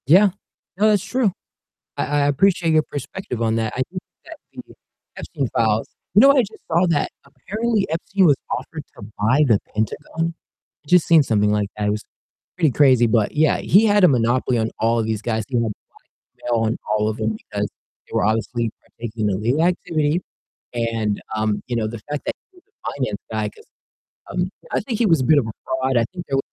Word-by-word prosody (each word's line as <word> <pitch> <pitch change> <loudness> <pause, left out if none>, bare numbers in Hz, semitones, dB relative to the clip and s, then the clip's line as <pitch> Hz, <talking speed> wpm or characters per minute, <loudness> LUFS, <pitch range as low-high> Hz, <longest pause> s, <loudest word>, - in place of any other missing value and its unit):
Yeah. 190 +7 +7 0.5
No, 215 +2 +4
that's 205 -3 +2
true. 250 -6 +1 0.7
I - - 0
I 145 0 +1
appreciate 170 +2 +2
your 155 -1 +4
perspective 145 - -5
on 110 -1 +1
that; 110 -1 -1
I 130 - -2
think 185 +1 -6 0.2
that 325 +1 -10 0.2
the - - -11 0.4
Epstein 140 -5 -3
files 110 -1 +2 0.3
you 205 - +7
know 275 - +8
what 280 - +5
I - - +7
just 220 -2 -8
saw 170 +3 +3
that 160 -4 +1 0.2
apparently 215 - -2
Epstein 185 +4 +1
was 145 -5 +5
offered 145 +4 -4
to - - -10 0.2
buy 120 +8 +3
the 110 -7 +3 0.2
Pentagon? 150 +9 -2 0.5
Just 180 +2 +5
seen 165 -3 +6
something 105 -4 +2
like 105 -1 +1
that, 105 -1 -1
it - - +2
was 105 0 -3 0.5
pretty 165 -5 +3
crazy 130 -4 +5
but 110 -2 +1
yeah, 155 0 +3
he 210 +4 +4
had 205 -1 +4
a - - +8
monopoly 125 -1 +2
on 110 0 0
all 115 +1 +2
of 110 - -1
these 110 -1 -2
guys, 110 -2 -1
he 125 - -2
had 115 - +2 0.5
blackmail 115 -2 -3
on 110 - -1
all 105 0 +1
of 110 - -5
'em 110 0 -1
because 105 -1 -4 0.4
they - - -15
were - - +2
obviously 115 +2 0
partaking 110 -2 -4
in 95 - 0
illegal 120 +9 +1
activity 165 -2 +1 0.5
and, 115 -3 -1
um, 110 -1 0
you 120 - -2
know, 110 -2 0
the 115 +1 -6
fact 150 -1 -3
that - - -1 0.2
he 370 - -20
was - - -35 0.3
finance - - -2
guy, - - -1
'cause, 440 0 -19 0.7
um, - - -1 0.2
I - - +1
think 240 -5 -3
he 235 - +3
was 165 -6 +4
a - - 0
bit 155 +3 +5
of 130 - -2
a - - -4
fraud, 130 -1 0
I 115 - +3
think 175 -1 -7
there 135 - +1
130 Hz, 210 wpm, -21 LUFS, 110-175 Hz, 0.7 s, know